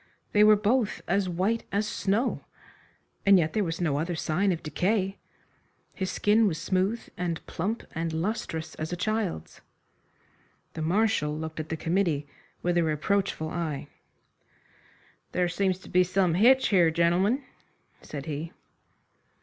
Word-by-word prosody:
They 210 Hz, -, +5 dB
were 215 Hz, 0 st, +8 dB
both 215 Hz, +2 st, 0 dB
as 195 Hz, 0 st, +1 dB
white 190 Hz, +7 st, 0 dB
as 205 Hz, +2 st, 0 dB
snow. 210 Hz, +5 st, 0 dB, 0.8 s
And 200 Hz, -1 st, +7 dB
yet 160 Hz, -3 st, +1 dB
there 215 Hz, -, +1 dB
was 165 Hz, -2 st, -3 dB
no 150 Hz, -5 st, 0 dB
other 170 Hz, +2 st, -2 dB
sign 180 Hz, +5 st, +1 dB
of 170 Hz, -, -3 dB
decay. 195 Hz, +4 st, 0 dB, 0.7 s
His 190 Hz, -1 st, -3 dB
skin 215 Hz, +1 st, +3 dB
was 165 Hz, -5 st, -1 dB
smooth 195 Hz, +5 st, 0 dB
and 175 Hz, -2 st, -3 dB
plump 210 Hz, +7 st, -3 dB
and 165 Hz, 0 st, -2 dB
lustrous 160 Hz, -2 st, -3 dB
as 155 Hz, +2 st, -5 dB
a -, -, -1 dB
child's. 200 Hz, -, -3 dB, 1.1 s
The 160 Hz, -, -5 dB
Marshal 165 Hz, -3 st, +1 dB
looked 160 Hz, 0 st, -5 dB
at 155 Hz, -, -5 dB
the 160 Hz, -, -2 dB
committee 165 Hz, -4 st, 0 dB, 0.4 s
with 175 Hz, 0 st, +2 dB
a -, -, +3 dB
reproachful 160 Hz, +1 st, 0 dB
eye. 160 Hz, -5 st, -3 dB, 1.4 s
"There 180 Hz, -1 st, +2 dB
seems 185 Hz, +1 st, 0 dB
to -, -, -13 dB
be 180 Hz, 0 st, +4 dB
some 185 Hz, -1 st, +1 dB
hitch 255 Hz, +8 st, +5 dB
here, 180 Hz, -5 st, +5 dB
gentlemen," 175 Hz, -, +2 dB, 0.6 s
said 140 Hz, -2 st, -7 dB
he. 155 Hz, +2 st, -5 dB
180 Hz, 145 wpm, -27 LUFS, 160-205 Hz, 1.4 s, were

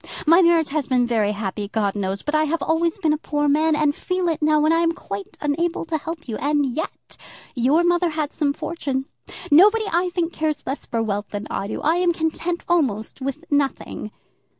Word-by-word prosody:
My 335 Hz, +4 st, +6 dB
marriage 335 Hz, -3 st, +4 dB
has 290 Hz, -1 st, -1 dB
been 250 Hz, -2 st, +2 dB
very 220 Hz, -4 st, +1 dB
happy, 205 Hz, 0 st, -4 dB
God 205 Hz, -2 st, 0 dB
knows; 195 Hz, -1 st, -3 dB
but 295 Hz, -, -3 dB
I 310 Hz, 0 st, +3 dB
have 325 Hz, +2 st, -1 dB
always 325 Hz, +2 st, +1 dB
been 320 Hz, -6 st, +1 dB
a 305 Hz, -, -2 dB
poor 295 Hz, -2 st, -1 dB
man, 310 Hz, +2 st, +3 dB
and 300 Hz, -1 st, +2 dB
feel 365 Hz, +2 st, -1 dB
it 315 Hz, -1 st, -2 dB
now 305 Hz, 0 st, +3 dB
when 310 Hz, +2 st, +3 dB
I 330 Hz, -, +3 dB
am 335 Hz, 0 st, +2 dB
quite 200 Hz, -, -7 dB
unable 330 Hz, +4 st, -1 dB
to 325 Hz, -1 st, -1 dB
help 320 Hz, +1 st, -7 dB
you. 225 Hz, -, -3 dB
And 290 Hz, 0 st, +1 dB
yet 320 Hz, -, -6 dB, 0.4 s
your 275 Hz, +7 st, +3 dB
mother 350 Hz, 0 st, +2 dB
had 305 Hz, -2 st, -2 dB
some 295 Hz, -3 st, 0 dB
fortune. 275 Hz, -4 st, -3 dB, 0.5 s
Nobody, 420 Hz, +8 st, +6 dB
I 355 Hz, +2 st, +2 dB
think, 350 Hz, -1 st, -2 dB
cares 310 Hz, -1 st, -2 dB
less 270 Hz, +2 st, -4 dB
for 230 Hz, -1 st, -1 dB
wealth 205 Hz, -1 st, -2 dB
than 205 Hz, 0 st, -5 dB
I 195 Hz, -, -2 dB
do. 215 Hz, -, -4 dB
I 320 Hz, +3 st, +3 dB
am 355 Hz, -1 st, +2 dB
content 330 Hz, +2 st, -2 dB
almost 265 Hz, -10 st, 0 dB
with 275 Hz, +5 st, -4 dB
nothing." 280 Hz, -6 st, -1 dB
305 Hz, 210 wpm, -22 LUFS, 260-335 Hz, 0.5 s, My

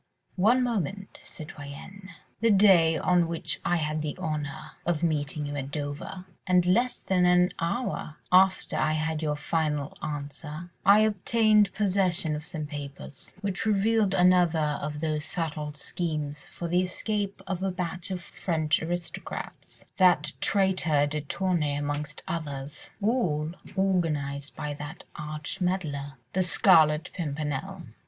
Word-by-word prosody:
"One 230 Hz, +7 st, +4 dB
moment, 205 Hz, -, -3 dB
citoyenne. 155 Hz, -, -10 dB, 0.3 s
The 230 Hz, +2 st, +3 dB
day 190 Hz, -6 st, +6 dB
on 180 Hz, -2 st, +3 dB
which 165 Hz, -1 st, -2 dB
I 175 Hz, -, +2 dB
had 155 Hz, -2 st, -1 dB
the 150 Hz, -1 st, -4 dB
honour 155 Hz, -1 st, -4 dB
of 170 Hz, -2 st, 0 dB
meeting 150 Hz, -2 st, 0 dB
you 145 Hz, 0 st, -4 dB
at 135 Hz, -1 st, -4 dB
Dover, 145 Hz, +6 st, -5 dB, 0.2 s
and 180 Hz, -1 st, +4 dB
less 235 Hz, +8 st, +2 dB
than 180 Hz, -2 st, +2 dB
an 180 Hz, 0 st, +4 dB
hour 170 Hz, -4 st, -2 dB
after 185 Hz, +1 st, +4 dB
I 155 Hz, 0 st, +2 dB
had 155 Hz, 0 st, -1 dB
your 150 Hz, -2 st, 0 dB
final 150 Hz, -1 st, -1 dB
answer, 150 Hz, +3 st, -6 dB
I 200 Hz, +2 st, +7 dB
obtained 215 Hz, 0 st, +3 dB
possession 185 Hz, -6 st, +2 dB
of 155 Hz, +1 st, -6 dB
some 155 Hz, -3 st, -4 dB
papers, 140 Hz, -2 st, -8 dB
which 200 Hz, +1 st, -2 dB
revealed 210 Hz, -1 st, +3 dB
another 175 Hz, -5 st, +3 dB
of 150 Hz, 0 st, -4 dB
those 155 Hz, -2 st, -1 dB
subtle 155 Hz, -4 st, -3 dB
schemes 150 Hz, -1 st, -4 dB
for 170 Hz, -, -5 dB
the 175 Hz, +2 st, +2 dB
escape 200 Hz, +2 st, -2 dB
of 190 Hz, -2 st, -3 dB
a 195 Hz, -, 0 dB
batch 180 Hz, +1 st, -4 dB
of 185 Hz, -2 st, -3 dB
French 160 Hz, -5 st, 0 dB
aristocrats—that 175 Hz, +2 st, -1 dB
traitor 185 Hz, -7 st, +3 dB
de 150 Hz, +1 st, -2 dB
Tournay 160 Hz, -2 st, 0 dB
amongst 145 Hz, 0 st, -3 dB
others—all 155 Hz, -, -2 dB, 0.3 s
organised 150 Hz, -7 st, 0 dB
by 150 Hz, 0 st, -4 dB
that 150 Hz, +1 st, -8 dB
arch 150 Hz, +4 st, -5 dB
meddler, 155 Hz, -7 st, -1 dB, 0.2 s
the 190 Hz, -, +2 dB
Scarlet 155 Hz, -3 st, +4 dB
Pimpernel. 155 Hz, +3 st, -3 dB
165 Hz, 130 wpm, -27 LUFS, 150-190 Hz, 0.3 s, I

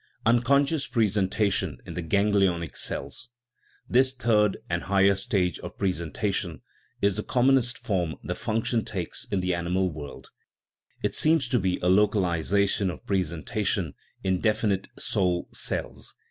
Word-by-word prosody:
Unconscious 140 Hz, +6 st, +3 dB
presentation 105 Hz, -2 st, +1 dB
in -, -, -7 dB
the 90 Hz, -, -3 dB
ganglionic 95 Hz, -3 st, +1 dB
cells. -, -, -4 dB, 0.6 s
This 130 Hz, +1 st, +3 dB
third 105 Hz, -5 st, +2 dB
and 85 Hz, 0 st, -1 dB
higher 100 Hz, +1 st, +4 dB
stage 95 Hz, -4 st, 0 dB
of -, -, -9 dB
presentation 90 Hz, 0 st, -2 dB, 0.4 s
is 100 Hz, -1 st, +2 dB
the -, -, 0 dB
commonest 125 Hz, -1 st, +2 dB
form 90 Hz, -6 st, -1 dB
the -, -, -2 dB
function 115 Hz, +1 st, -1 dB
takes 90 Hz, -5 st, -4 dB
in 95 Hz, -, -1 dB
the 90 Hz, 0 st, 0 dB
animal 90 Hz, +2 st, 0 dB
world; 75 Hz, -2 st, -9 dB, 0.7 s
it -, -, 0 dB
seems 155 Hz, -4 st, +2 dB
to 125 Hz, -1 st, +2 dB
be 90 Hz, -2 st, 0 dB
a -, -, +2 dB
localization 100 Hz, 0 st, +2 dB
of 80 Hz, -7 st, -8 dB
presentation 95 Hz, -1 st, -1 dB, 0.3 s
in 95 Hz, -1 st, +1 dB
definite 105 Hz, -3 st, +1 dB
" -, -, -33 dB
soul 90 Hz, -2 st, 0 dB
cells. -, -, -3 dB
100 Hz, 135 wpm, -26 LUFS, 90-110 Hz, 0.7 s, higher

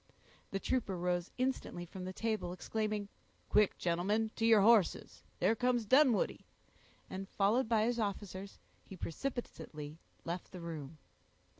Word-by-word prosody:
The 195 Hz, -, -2 dB
trooper 210 Hz, -5 st, -1 dB
rose 175 Hz, 0 st, 0 dB
instantly 255 Hz, -8 st, -2 dB
from 185 Hz, +1 st, -8 dB
the 185 Hz, -, -4 dB
table, 215 Hz, -3 st, -2 dB
exclaiming,— 210 Hz, +2 st, -2 dB, 0.4 s
"Quick, 210 Hz, -1 st, +4 dB
gentlemen, 200 Hz, +6 st, +1 dB
to 225 Hz, -, +1 dB
your 220 Hz, -3 st, +7 dB
horses; 215 Hz, -3 st, +3 dB, 0.2 s
there -, -, +4 dB
comes 245 Hz, 0 st, +1 dB
Dunwoodie," 260 Hz, 0 st, +4 dB, 0.6 s
and, 190 Hz, +1 st, -6 dB
followed 220 Hz, +5 st, +2 dB
by 220 Hz, -2 st, +4 dB
his 240 Hz, +1 st, +1 dB
officers, 200 Hz, -2 st, -4 dB, 0.3 s
he 190 Hz, -, -11 dB
precipitately 165 Hz, -, -5 dB, 0.3 s
left 170 Hz, +1 st, -4 dB
the 180 Hz, -, -6 dB
room. 160 Hz, -3 st, -6 dB
205 Hz, 135 wpm, -34 LUFS, 180-225 Hz, 0.6 s, your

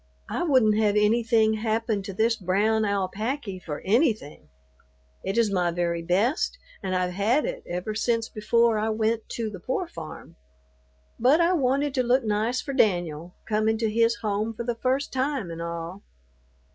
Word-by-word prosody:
"I -, -, -2 dB
wouldn't 255 Hz, -10 st, +4 dB
have 210 Hz, -2 st, +2 dB
anything 220 Hz, +1 st, +3 dB
happen 220 Hz, -1 st, -1 dB
to 195 Hz, -, -6 dB
this 225 Hz, +4 st, +2 dB
brown 215 Hz, +3 st, +1 dB
alapacky 200 Hz, +2 st, -2 dB
for 150 Hz, -4 st, -6 dB
anything; 215 Hz, -, 0 dB, 0.7 s
it 195 Hz, +4 st, -2 dB
is 225 Hz, -3 st, +3 dB
my 180 Hz, -3 st, +1 dB
very 170 Hz, 0 st, -1 dB
best, 210 Hz, -, +1 dB, 0.2 s
and 185 Hz, -1 st, -2 dB
I've 180 Hz, 0 st, 0 dB
had 215 Hz, +10 st, +1 dB
it -, -, -4 dB
ever 180 Hz, +5 st, -3 dB
since 230 Hz, +1 st, 0 dB
before 230 Hz, +1 st, +2 dB
I 220 Hz, +1 st, 0 dB
went 220 Hz, +1 st, -1 dB
to 225 Hz, -2 st, -3 dB
the 195 Hz, -, -8 dB
pore 260 Hz, -, -2 dB
farm; 165 Hz, -, -10 dB, 0.8 s
but 265 Hz, +7 st, +5 dB
I 340 Hz, +2 st, +3 dB
wanted 280 Hz, -2 st, +1 dB
to 260 Hz, -, +2 dB
look 250 Hz, +1 st, +2 dB
nice 220 Hz, +3 st, 0 dB
for 275 Hz, -, -4 dB
Danyul, 175 Hz, -, 0 dB
comin' 215 Hz, +1 st, +1 dB
to 220 Hz, -1 st, 0 dB
his 230 Hz, +1 st, +3 dB
home 215 Hz, +2 st, -1 dB
for 235 Hz, -, -4 dB
the 240 Hz, 0 st, -1 dB
first 260 Hz, +4 st, -1 dB
time 265 Hz, -, -1 dB
an' 165 Hz, 0 st, -6 dB
all." 170 Hz, +3 st, -5 dB
220 Hz, 170 wpm, -26 LUFS, 195-240 Hz, 0.8 s, but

